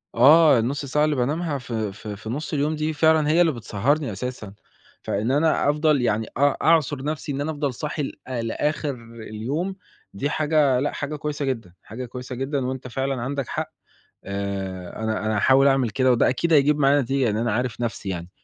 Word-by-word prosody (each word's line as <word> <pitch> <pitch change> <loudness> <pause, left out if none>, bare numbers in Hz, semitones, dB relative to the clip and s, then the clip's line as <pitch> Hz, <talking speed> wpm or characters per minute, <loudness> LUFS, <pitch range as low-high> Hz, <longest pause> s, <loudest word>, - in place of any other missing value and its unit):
آه 145 +2 +7
النُص 140 +5 -2
ساعة 150 +3 +2
اللي 150 -1 +1
بانامها 145 +4 -1
في 110 -5 -3
في 105 +1 -8
في 110 +2 -9
نُص 150 +6 -4
اليوم 150 +2 0
دي 155 +1 -1
فعلًا 160 0 +3
هي 170 +3 +4
اللي 165 -2 +4
بتسهّرني 120 +3 -1
أساسًا، 110 -1 -6 0.5
فإن 110 +6 -1
أنا 150 0 +2
أفضَل 150 -2 +2
يعني 110 -2 0
أ 145 0 +3
أعصُر 150 -4 +2
نفسي، 150 -1 -3
إن 140 +1 -3
أنا 160 +2 -1
أفضَل 145 -3 -2
صاحي 150 +3 -3
ل - - -3 0.4
لآخِر 150 +3 -1 0.4
اليوم 145 - -3 0.4
دي 140 +9 -2
حاجة 150 -4 +2
لأ 145 - 0
حاجة 145 +1 -4
كويسة 145 -1 -3
جدًا، 115 -9 -3
حاجة 125 +4 -7
كويسة 125 +1 -7
جدًا 135 0 -2
وأنت 130 0 -4
فعلًا 135 0 -2
عندَك 140 0 -3
حق، - - -4 0.5
آآ 100 0 -4
أنا 110 -2 -1
أنا 110 0 0
هاحاول 135 +5 +5
أعمل 135 -4 +3
كده 130 +2 +2
وده 120 +1 +3
أكيد 165 +6 0
هيجيب 150 +1 +4
معايا 140 +1 +4
نتيجة، 135 +1 0
لإن 105 -1 0
أنا 115 -2 0
عارف 125 0 -2
نفسي 110 -4 -3
يعني. 85 -1 -5
135 Hz, 190 wpm, -23 LUFS, 115-150 Hz, 0.5 s, آه